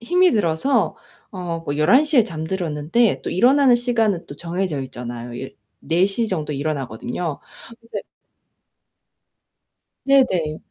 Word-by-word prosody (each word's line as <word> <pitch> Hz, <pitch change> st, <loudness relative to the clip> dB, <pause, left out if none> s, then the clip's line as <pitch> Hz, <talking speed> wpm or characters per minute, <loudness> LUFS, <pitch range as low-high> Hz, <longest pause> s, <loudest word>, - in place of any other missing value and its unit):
힘이 360 Hz, +9 st, +3 dB
들어서 210 Hz, -, +1 dB, 0.3 s
어 175 Hz, -3 st, -4 dB
뭐 145 Hz, -1 st, -3 dB
11:00 270 Hz, -, +4 dB
에 235 Hz, -, +6 dB
잠들었는데 165 Hz, +4 st, -1 dB
또 -, -, -4 dB
일어나는 255 Hz, +5 st, +5 dB
시간은 225 Hz, -7 st, 0 dB
또 -, -, -9 dB
정해져 170 Hz, -2 st, -3 dB
있잖아요. 120 Hz, -2 st, -7 dB
예 135 Hz, -, -8 dB, 0.3 s
16:00 195 Hz, +7 st, +1 dB
정도에 150 Hz, -5 st, -3 dB
일어나거든요. 140 Hz, +1 st, -3 dB, 0.5 s
이제 230 Hz, -, -5 dB, 2.1 s
네네. 185 Hz, -, +3 dB
175 Hz, 240 characters per minute, -21 LUFS, 150-235 Hz, 2.1 s, 에